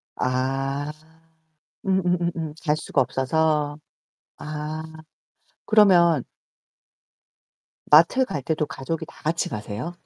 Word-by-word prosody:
아 135 Hz, +3 st, -1 dB, 0.9 s
음음음음 175 Hz, -4 st, 0 dB
갈 150 Hz, -1 st, +1 dB
수가 145 Hz, -3 st, 0 dB
없어서. 145 Hz, +3 st, 0 dB, 0.6 s
아 155 Hz, +1 st, -5 dB, 0.8 s
그러면 175 Hz, -, +5 dB, 1.7 s
마트 170 Hz, -, +6 dB
갈 155 Hz, -, -4 dB
때도 155 Hz, +2 st, -1 dB
가족이 155 Hz, +4 st, -5 dB
다 -, -, -17 dB
같이 165 Hz, +2 st, -1 dB
가세요? 110 Hz, +8 st, -5 dB
155 Hz, 175 characters per minute, -24 LUFS, 135-170 Hz, 1.7 s, 마트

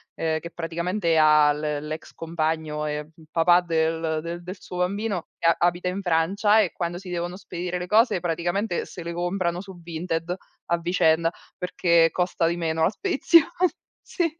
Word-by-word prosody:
ehm, 160 Hz, -1 st, -1 dB
che 170 Hz, +1 st, -9 dB
praticamente 170 Hz, +1 st, -1 dB
ha 150 Hz, -1 st, +6 dB
l 150 Hz, -, -6 dB, 0.3 s
l'ex 155 Hz, +1 st, -6 dB
compagno, 160 Hz, -2 st, -2 dB
e 150 Hz, 0 st, -2 dB, 0.2 s
il 160 Hz, -1 st, -18 dB
papà 175 Hz, +2 st, +5 dB
del 165 Hz, 0 st, -1 dB
del 185 Hz, +2 st, -7 dB
suo 180 Hz, -, -8 dB
bambino, 195 Hz, 0 st, -1 dB, 0.3 s
abita 175 Hz, +1 st, +1 dB
in 190 Hz, +2 st, -2 dB
Francia, 195 Hz, +5 st, +3 dB
e 195 Hz, -5 st, +1 dB
quando 175 Hz, 0 st, -3 dB
si 185 Hz, 0 st, -9 dB
devono 175 Hz, +1 st, -3 dB
spedire 180 Hz, -1 st, -4 dB
le 180 Hz, -, -5 dB
cose, 220 Hz, -1 st, +4 dB
praticamente 175 Hz, +3 st, -1 dB
se 175 Hz, -, -9 dB
le 170 Hz, -, -5 dB
comprano 175 Hz, 0 st, -1 dB
su 190 Hz, -3 st, -11 dB
Vinted 165 Hz, +1 st, -3 dB, 0.3 s
a 170 Hz, -, +1 dB
vicenda, 165 Hz, -1 st, +2 dB, 0.3 s
perché 170 Hz, -2 st, +3 dB
costa 180 Hz, -1 st, 0 dB
di 170 Hz, +1 st, -1 dB
meno 160 Hz, -1 st, 0 dB
la -, -, +5 dB
spedizione, 335 Hz, -, +4 dB, 0.6 s
sì. 350 Hz, -, -1 dB
170 Hz, 165 wpm, -25 LUFS, 165-180 Hz, 0.6 s, ha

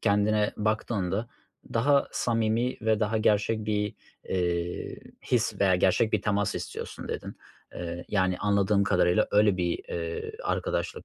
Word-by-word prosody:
kendine 105 Hz, +1 st, +2 dB
baktığında 105 Hz, -1 st, -1 dB, 0.5 s
daha 140 Hz, +4 st, +3 dB
samimi 115 Hz, +1 st, 0 dB
ve 110 Hz, -1 st, +2 dB
daha 110 Hz, +1 st, +1 dB
gerçek 110 Hz, +1 st, +2 dB
bir, 105 Hz, -1 st, 0 dB, 0.3 s
eee, 85 Hz, -1 st, -2 dB, 0.4 s
his -, -, +1 dB
veya 95 Hz, -2 st, +4 dB
gerçek 95 Hz, +5 st, +2 dB
bir -, -, +1 dB
temas 105 Hz, -1 st, 0 dB
istiyorsun -, -, -6 dB
dedin. -, -, -5 dB, 0.4 s
Eee, 85 Hz, 0 st, -5 dB
yani 95 Hz, -3 st, +1 dB
anladığım 100 Hz, 0 st, +2 dB
kadarıyla 90 Hz, +2 st, +3 dB
öyle 105 Hz, -2 st, +4 dB
bir, 85 Hz, -2 st, 0 dB
eee, 85 Hz, -1 st, -4 dB
arkadaşlık. -, -, -2 dB
105 Hz, 130 wpm, -27 LUFS, 95-110 Hz, 0.5 s, veya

